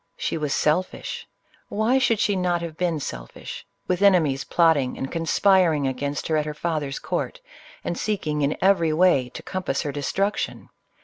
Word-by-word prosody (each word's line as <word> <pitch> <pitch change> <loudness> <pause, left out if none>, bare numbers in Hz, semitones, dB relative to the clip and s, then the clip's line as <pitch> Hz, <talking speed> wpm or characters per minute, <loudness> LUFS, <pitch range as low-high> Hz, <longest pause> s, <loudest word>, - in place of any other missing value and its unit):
She - - -2
was 150 -3 -2
sel 155 +6 +3
fish: 185 - -8 0.2
— - - -31
why 225 +5 +2
should 230 -5 +2
she 205 - +2
not 175 -2 0
have 165 -2 -5
been 170 -2 0
selfish, - - -7 0.2
with 180 +1 0
ene 200 -1 +7
mies 145 -6 +1
plotting 160 -7 +3
and 135 - -4
conspiring 165 -2 +3
against 140 +2 -2
her 160 - +1
at 150 - 0
her 150 - -4
father's 150 -4 -2
court, - - -3 0.4
and 175 - -2
seeking 160 -8 -1
in 140 +1 +1
every 180 -5 +3
way 155 -7 +3
to - - -9
compass 185 -8 -2
her 145 - -2
de 145 +1 -5
struction? 195 +8 -2
165 Hz, 185 wpm, -24 LUFS, 145-185 Hz, 0.4 s, ene